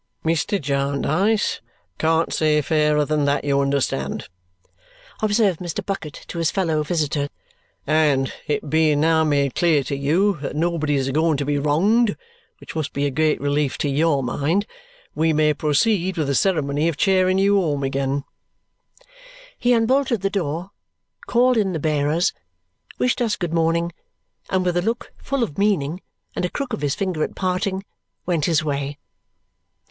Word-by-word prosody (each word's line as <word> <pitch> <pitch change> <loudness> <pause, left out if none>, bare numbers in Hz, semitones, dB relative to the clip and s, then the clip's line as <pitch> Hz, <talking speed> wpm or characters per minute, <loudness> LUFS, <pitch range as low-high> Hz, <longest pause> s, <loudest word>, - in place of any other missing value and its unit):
"Mr. 165 +5 +1
Jarndyce 145 +8 0 0.4
can't 160 +1 +1
say 155 -1 +2
fairer 150 0 +2
than 150 -1 0
that, 140 0 +1
you 140 -1 +2
understand," 140 - -1 0.9
observed 205 -4 +2
Mr. 175 -2 -4
Bucket 185 -7 -5
to 170 - -5
his 165 -2 +2
fellow 165 -6 0
visitor. 150 -2 -1 0.6
"And 145 -3 +2
it 150 0 -1
being 155 0 +3
now 160 +1 +3
made 140 -3 +1
clear 160 -5 +2
to 140 - -3
you 170 +8 +1
that 145 0 -5
nobody's 155 -4 0
a - - -1
going 155 +1 +2
to 140 - -2
be 145 0 0
wronged 200 +11 +2 0.4
which - - -11
must 155 -3 -3
be 140 +1 -1
a 140 - 0
great 155 +2 +1
relief 145 0 0
to 145 - -1
YOUR 145 0 +2
mind 150 - 0 0.5
we 160 0 +1
may 150 0 +3
proceed 180 +5 +1
with 155 - 0
the 140 - 0
ceremony 150 -3 +1
of 165 -4 -1
chairing 185 0 +3
you 200 +1 +3
home 145 -5 -1
again." 135 +1 -1 1.3
He 245 - +1
unbolted 245 0 +2
the 195 0 0
door, 175 -1 -3 0.6
called 250 +1 +3
in 195 -4 +1
the 160 - -2
bearers, 150 +4 +1 0.6
wished 250 0 0
us 225 -3 +1
good 175 -3 -4
morning, 170 +1 +1 0.6
and 185 -1 0
with 175 -1 +1
a - - +2
look 230 +5 -3
full 275 -2 -2
of 195 -6 -4
meaning 180 -5 +1 0.3
and - - -2
a 180 - 0
crook 275 +1 -4
of 215 - -3
his 145 -2 0
finger 185 -6 -1
at - - -4
parting 190 +1 -1 0.4
went 165 -5 0
his 160 -3 +2
way. 140 -1 -3
160 Hz, 160 wpm, -22 LUFS, 145-190 Hz, 1.3 s, being